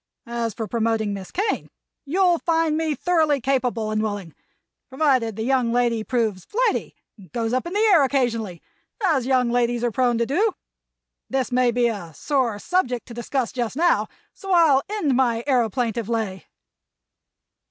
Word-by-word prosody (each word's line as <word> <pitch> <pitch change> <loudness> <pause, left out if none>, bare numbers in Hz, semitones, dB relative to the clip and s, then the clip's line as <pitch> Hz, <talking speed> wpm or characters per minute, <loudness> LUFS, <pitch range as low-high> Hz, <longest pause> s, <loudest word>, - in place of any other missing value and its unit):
As 235 -2 -3
for 225 - -3
promoting 225 -1 0
Miss 195 -2 -7
Kane, 410 +3 -2 0.4
you'll 350 +3 +2
find 325 -2 +1
me 315 -1 0
thoroughly 315 -5 +2
capable 250 -4 0
and 215 0 0
willing—provided 225 - -3
the 220 - -3
young 250 -1 +1
lady 235 -2 +1
proves 220 -6 -1
flighty - - -1 0.2
and 185 - -16
goes 230 -1 -2
up 255 +6 0
in 345 - -6
the 430 +2 +3
air 320 -5 +6
occasionally, 230 - -1 0.4
as 280 -9 +1
young 255 -2 +2
ladies 240 0 +1
are 240 - +1
prone 245 0 +1
to 235 - +1
do. 385 - +1 0.8
This 265 -1 -1
may 250 0 +3
be 240 0 +2
a 185 -9 -5
soar 260 - 0
subject 250 - -1
to - - -8
discuss 240 +1 -2
just 245 -2 -3
now, 340 +4 +2 0.3
so 390 -1 -7
I'll 320 -6 +5
end 375 -11 0
my 240 -3 +1
aëroplaintive 235 -4 0
lay." 215 -6 -3
245 Hz, 160 wpm, -23 LUFS, 225-285 Hz, 0.8 s, air